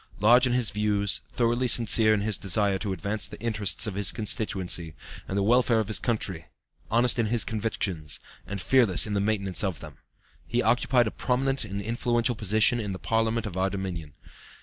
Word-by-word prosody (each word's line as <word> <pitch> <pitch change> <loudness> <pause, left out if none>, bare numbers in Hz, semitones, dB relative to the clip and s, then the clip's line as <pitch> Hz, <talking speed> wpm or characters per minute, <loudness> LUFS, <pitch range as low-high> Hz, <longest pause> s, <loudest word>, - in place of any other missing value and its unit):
Large 120 +5 +5
in 120 - -1
his 125 -3 +2
views, 105 -1 -1
thoroughly 120 +1 0
sincere 115 -2 +5
in 105 -1 +1
his 105 -1 -2
desire 100 0 0
to 100 -1 -4
advance 100 +2 -2
the - - -11
interests 105 -3 0
of 105 - -3
his 100 0 +2
constituency, 95 -7 -2 0.3
and 95 - -4
the 100 - +1
welfare 120 +1 +2
of 110 -1 -3
his 110 - +2
country, 95 -8 -3 0.4
honest 120 +2 +3
in 115 - +1
his 115 +1 +4
convictions, 100 -8 -4 0.3
and 100 +1 -5
fearless 115 -2 +3
in 105 - -4
the 100 - 0
maintenance 100 -1 0
of 95 -6 -2
them, - - -12 0.5
he 120 +1 -1
occupied 120 +2 +2
a 110 - -3
prominent 135 0 -1
and 100 -1 -6
influential 120 +2 0
position 110 +2 +2
in 105 -3 -4
the - - -6
parliament 115 +2 -1
of 100 -5 -6
our 95 +1 0
Dominion. 90 -6 -6
110 Hz, 190 wpm, -26 LUFS, 100-115 Hz, 0.5 s, Large